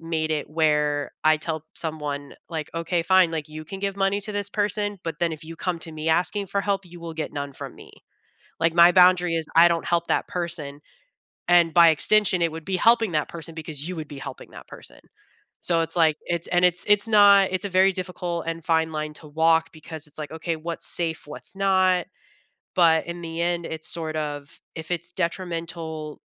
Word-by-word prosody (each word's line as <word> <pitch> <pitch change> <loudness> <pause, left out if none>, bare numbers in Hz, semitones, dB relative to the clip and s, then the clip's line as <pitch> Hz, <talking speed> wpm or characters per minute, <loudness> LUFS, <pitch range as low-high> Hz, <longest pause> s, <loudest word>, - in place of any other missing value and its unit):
made 160 -1 -2
it 155 -1 -2
where 150 -2 +1
I 155 0 +5
tell 155 0 -4
someone, 150 -3 -4
like, 160 -3 -5
"Okay, 165 +1 -1
fine," 185 -1 +4
like, 155 -1 -4
"You 155 0 -8
can 190 +4 -8
give 200 0 -2
money 195 +1 +1
to 215 - -6
this 205 -1 -3
person, 205 0 -1
but 165 -2 -5
then 170 -1 0
if 155 0 -8
you 165 +1 -9
come 180 0 -2
to 165 - -6
me 155 +1 -4
asking 180 +5 +1
for 200 +1 -1
help, 200 -2 -1
you 175 0 -13
will 165 -1 -6
get 160 - -4
none 140 -1 -5
from - - -8
me." - - -15 0.7
Like, 165 0 +2
my 170 0 +8
boundary 180 -1 +5
is 160 -2 -2
I 165 +1 +8
don't 170 -1 -1
help 170 -1 +1
that - - 0
person, 160 -5 -5 0.7
and 170 -2 +4
by 170 0 +8
extension 185 +3 +3
it 165 -1 +2
would 165 0 -7
be 190 -1 -1
helping 230 -1 +4
that 150 -2 0
person 165 -1 -8
because 155 -2 -5
you 185 - -4
would 155 -2 -5
be 145 -1 -9
helping - - -9
that - - -12
person. - - -12 0.6
So, 170 -2 +1
it's 165 0 -2
like, 160 -2 +4
it's 170 -1 -2
and 175 0 +1
it's 180 0 +2
it's 205 +1 +4
not 200 -3 +6
it's 185 +2 -2
a - - -2
very 190 +1 +4
difficult 180 -2 -4
and 165 0 -4
fine 160 -1 +2
line 155 0 -4
to 155 - -12
walk 160 +2 +2
because 160 -1 -10
it's, 150 - -12
like, 150 - -6
"Okay, 160 +1 -3
what's 165 +1 -5
safe? 165 -3 -2
What's 150 - -4
not?" 185 -2 +2 0.7
but 165 -3 +4
in 170 0 -6
the 165 0 -6
end, 170 0 -1
it's 160 0 -5
sort 160 -2 -2
of 145 -2 -5 0.2
if 160 0 -7
it's 175 -1 -3
detrimental 165 -3 -4
165 Hz, 210 wpm, -24 LUFS, 155-180 Hz, 0.7 s, my